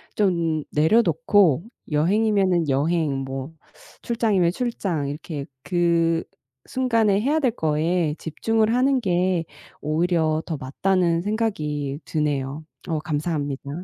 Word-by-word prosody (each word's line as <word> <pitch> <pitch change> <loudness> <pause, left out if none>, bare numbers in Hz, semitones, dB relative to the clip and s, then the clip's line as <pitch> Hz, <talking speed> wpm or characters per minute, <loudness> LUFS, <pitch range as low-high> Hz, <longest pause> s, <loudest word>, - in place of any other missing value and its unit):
좀 170 -6 +1
내려놓고 165 - +3 0.3
여행이면은 185 +1 +2
여행 145 +1 +1
뭐 135 +2 -5 0.5
출장이면 215 -7 +1
출장 190 - -2
이렇게 145 0 -5 0.2
그 170 0 +1 0.4
순간에 225 -6 +1
해야 290 +7 +2
될 260 -5 +2
거에 160 -3 0
집중을 220 +7 0
하는 260 +2 +3
게 180 -3 +1 0.4
오히려 160 0 +1
더 160 - -3
맞다는 170 +5 +1
생각이 150 -10 -2
드네요. 145 -1 -2 0.2
어 160 - -1
감사합니다. 145 -3 -3
170 Hz, 245 characters per minute, -23 LUFS, 150-200 Hz, 0.5 s, 내려놓고